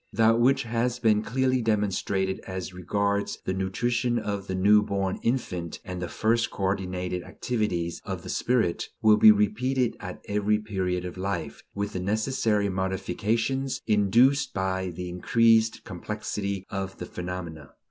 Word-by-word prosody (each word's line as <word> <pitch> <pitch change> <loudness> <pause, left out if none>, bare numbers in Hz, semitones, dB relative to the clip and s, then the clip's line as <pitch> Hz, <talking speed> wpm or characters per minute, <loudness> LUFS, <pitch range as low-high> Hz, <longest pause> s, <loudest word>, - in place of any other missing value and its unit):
That 115 +2 +4
which 130 +3 +3
has 120 +1 -1
been 110 -2 +3
clearly 130 +2 +1
demonstrated 100 -3 0
as 95 -1 -5
regards 100 +3 -1
the 95 - 0
nutrition 120 +6 0
of 100 -3 -3
the 95 - -2
new 105 +3 +5
born 100 -2 -2
infant 90 -9 -2
and 90 -1 -5
the 90 - -2
first 115 +5 +1
coordinated 90 -2 -2
activities 90 -7 -2
of - - -5
the - - -8
spirit 115 -9 0
will 110 -1 +6
be 110 0 +9
repeated 120 +5 +1
at 90 -3 -7
every 105 +1 +1
period 95 -4 -2
of 90 - -7
life, 90 -3 -3
with 100 +1 -3
the 90 - -2
necessary 105 +1 +1
modifications 105 +8 -1
induced 115 +7 +3
by 95 -1 -1
the 90 +1 -6
increased 110 +5 +3
complexity 100 0 -4
of 95 -1 -4
the 90 - -6
phenomena. 85 -5 -6
100 Hz, 145 wpm, -26 LUFS, 95-115 Hz, -, be